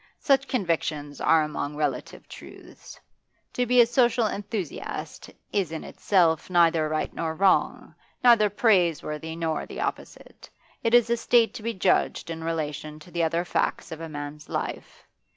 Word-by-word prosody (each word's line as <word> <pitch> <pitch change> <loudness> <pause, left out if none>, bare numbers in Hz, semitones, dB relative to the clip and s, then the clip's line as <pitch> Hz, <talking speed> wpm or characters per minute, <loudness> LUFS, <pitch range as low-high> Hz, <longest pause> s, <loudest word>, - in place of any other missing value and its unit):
Such 275 -1 +2
convictions 160 - -2
are 160 -1 +4
among 150 -1 -4
relative 150 -2 -3
truths. - - -13 0.5
To 250 0 0
be 250 +1 +4
a - - +6
social 240 -1 +2
enthusiast 205 -4 -5 0.2
is 195 -6 0
in 160 - -5
itself 170 -5 +1
neither 165 -3 +3
right 155 0 -2
nor 160 -1 -3
wrong, 190 +2 +1 0.3
neither 230 -4 +6
praiseworthy 170 -7 +1
nor 165 -2 -2
the - - -8
opposite; - - -6 0.3
it 230 +1 +3
is 235 -1 +4
a 235 - +2
state 235 0 +3
to 250 - -8
be 230 +1 -3
judged 180 -2 +1
in 165 0 -6
relation 155 -2 -4
to 155 +3 -15
the 170 - -1
other 165 +2 0
facts - - -1
of 160 0 -7
a 165 - -6
man's 145 0 -8
life. - - -5
170 Hz, 155 wpm, -25 LUFS, 155-220 Hz, 0.5 s, a